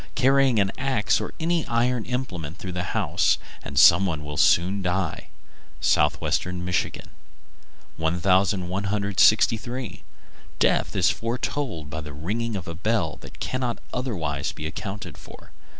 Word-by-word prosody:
Carry 135 0 +4
an 100 -5 +2
axe 130 -6 +1
or - - -4
any 165 0 +1
iron 120 0 +1
implement 95 - -4
through 95 - -6
the 90 0 -2
house, - - +1 0.2
and 70 - -8
some 85 +7 +7
one 80 -4 -3
will 75 0 -5
soon 95 +7 +3
die. 90 -2 -2 0.5
Southwestern 90 0 +1
Michigan. 90 -2 -2 0.9
1163. 100 +6 +1 0.6
Death - - +2
is - - +4
foretold 115 - -3
by 80 0 -4
the 75 -1 -8
ringing 110 +10 -3
of 95 - -5
a 85 - -4
bell 95 -2 -1
that - - -13
cannot 130 -2 -2 0.2
otherwise 80 - -2
be 75 - -8
accounted 100 +5 -6
for. - - -14
95 Hz, 130 wpm, -25 LUFS, 85-115 Hz, 0.9 s, some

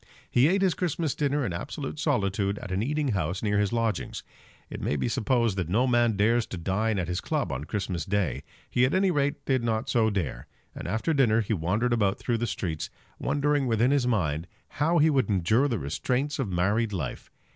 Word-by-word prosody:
He 125 +4 +5
ate 195 +3 +2
his 185 -3 +3
Christmas 165 -4 -1
dinner 145 -1 0
in 95 - -2
absolute 135 - -5
solitude 100 - 0
at 100 - -7
an 95 +2 0
eating 145 +3 0
house 95 -3 -1
near 105 -1 +2
his 105 -2 +1
lodgings. 115 -2 -1 0.4
It - - -7
may - - 0
be 70 - -1
supposed 115 -3 +1
that 90 -4 -2
no 115 +8 +3
man 120 -4 +2
dares 115 +3 +2
to 95 - -6
dine 100 +6 0
at 90 -3 -1
his 90 0 -2
club - - -1
on 70 0 -3
a - - -6
Christmas 90 -2 -2
Day. 100 -5 -1 0.3
He 125 - +1
at 130 +6 +3
any 190 0 +3
rate 145 -2 -1
did 130 -3 +1
not 110 -1 -1
so 115 -2 +3
dare; 80 - -3 0.3
and - - -7
after 110 - 0
dinner 115 -6 +3
he 110 +1 -1
wandered 105 +7 0
about 100 -4 +1
through 115 -2 -1
the 120 - -1
streets, 80 -7 -3 0.3
wondering 145 -1 +1
within 115 +2 +2
his 140 -3 +2
mind 85 -8 0 0.2
how 165 +4 +1
he 155 0 +5
would 135 -4 +1
endure 110 +8 +3
the 120 -5 -1
restraints 125 - -2
of 130 -7 -1
married 100 +5 +1
life. 75 -9 -4
115 Hz, 210 wpm, -27 LUFS, 95-135 Hz, 0.4 s, He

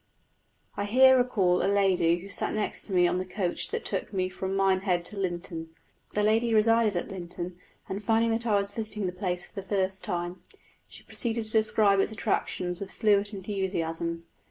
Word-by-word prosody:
I 200 - -2
here 260 +5 +6
recall 205 -8 +2
a 195 - +2
lady 185 -4 +3
who 195 - -10
sat 200 - -2
next 215 -1 -2
to - - -9
me 180 -2 +4
on 180 - 0
the - - -1
coach 185 -1 -1
that 460 0 -4
took - - -2
me 185 -2 -1
from 190 +1 -4
Minehead 190 -2 +1
to 210 - -1
Lynton. 175 -4 -4 0.4
The 210 - +2
lady 225 +2 +2
resided 225 -1 +4
at 175 - -2
Lynton, 175 -1 -7 0.3
and 200 +2 -5
finding 225 +2 +2
that 230 +1 -1
I 210 - +3
was 200 0 0
visiting 215 -1 -4
the 180 - -1
place 180 -1 -2
for - - -19
the 195 - -5
first 190 -1 -1
time, 175 -2 -3 0.5
she - - -13
proceeded 230 -1 -2
to 215 - +6
describe 215 -2 +4
its 195 - +1
attractions 185 -4 -2
with 200 - -6
fluent 205 -2 +2
enthusiasm. 170 -4 -3
195 Hz, 190 wpm, -28 LUFS, 180-215 Hz, 0.5 s, here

